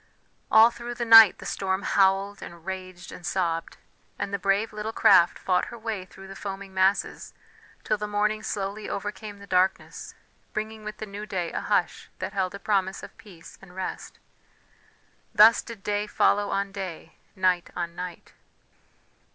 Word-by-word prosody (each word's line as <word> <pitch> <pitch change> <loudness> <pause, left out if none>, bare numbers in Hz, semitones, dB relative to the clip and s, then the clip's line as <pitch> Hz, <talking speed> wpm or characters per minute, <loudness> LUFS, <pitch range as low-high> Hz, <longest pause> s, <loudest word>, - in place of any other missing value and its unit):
All 225 +2 +7
through 240 +1 -7
the 235 - -3
night 225 -3 +9
the - - -11
storm 190 0 -2
howled, 195 +1 +2
and 170 -1 -11
raged, 185 -2 -7
and 180 - -11
sobbed; 165 -1 -2 0.4
and 200 - -4
the 200 - -1
brave 200 +3 0
little 210 +1 -4
craft 175 -5 +5
fought 180 -1 0
her 235 - -9
way 220 -4 -4
through 190 +1 -14
the 195 - -10
foaming 195 -1 -7
masses, 190 +1 0 0.5
till - - 0
the 210 - -3
morning 210 +1 0
slowly 205 -1 -4
overcame 205 +1 -5
the 200 - -12
darkness, 190 0 -1 0.4
bringing 215 0 -5
with 215 0 -7
the 215 - -6
new 205 +1 -8
day 180 -4 -3
a - - -3
hush - - -1
that - - -5
held 190 -1 -1
a - - -8
promise 195 -2 -1
of - - -11
peace 180 -6 -14
and 180 -2 -15
rest. 190 -1 -6 1.2
Thus 220 +2 +7
did 225 -4 -11
day 205 0 -1
follow 205 -1 +2
on 195 0 -1
day, 185 -4 -7 0.2
night 185 -2 +1
on 170 -1 -3
night. 180 -1 -8
195 Hz, 165 wpm, -26 LUFS, 185-210 Hz, 1.2 s, night